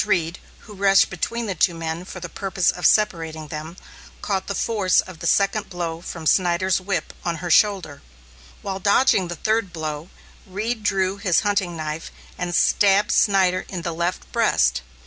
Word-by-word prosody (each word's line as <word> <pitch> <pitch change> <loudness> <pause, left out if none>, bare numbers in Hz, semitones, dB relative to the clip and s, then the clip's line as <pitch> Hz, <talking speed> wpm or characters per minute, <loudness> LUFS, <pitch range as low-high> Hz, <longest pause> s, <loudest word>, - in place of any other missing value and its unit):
Reed, 170 0 0 0.2
who 210 - -13
rushed 195 0 +4
between 230 +6 -3
the 200 - -2
two 175 0 +2
men 165 +1 -4
for 185 - -8
the 180 - -6
purpose 190 0 0
of 180 - +1
separating 160 -7 0
them, 155 +3 -7 0.5
caught 190 -2 -2
the 200 - -3
force 205 -5 +2
of 185 -3 -4
the - - -3
second 200 +1 +1
blow 170 -2 -4
from 165 -2 -7
Snyder's 180 +2 +2
whip 190 0 -3
on 170 -1 -1
her 170 +1 -4
shoulder. 185 -7 +2 0.6
While 195 -1 -4
dodging 200 -1 +3
the 175 - -5
third 220 +1 0
blow, 155 0 -5 0.4
Reed 215 +5 -3
drew 195 -1 0
his 200 -4 +2
hunting 200 -5 -1
knife 155 0 -5 0.2
and 175 -1 -3
stabbed 200 0 +3
Snyder 190 -3 +3
in 180 -3 -5
the 170 -1 -3
left 170 +2 -3
breast. 65 - +2
185 Hz, 170 wpm, -22 LUFS, 170-200 Hz, 0.6 s, rushed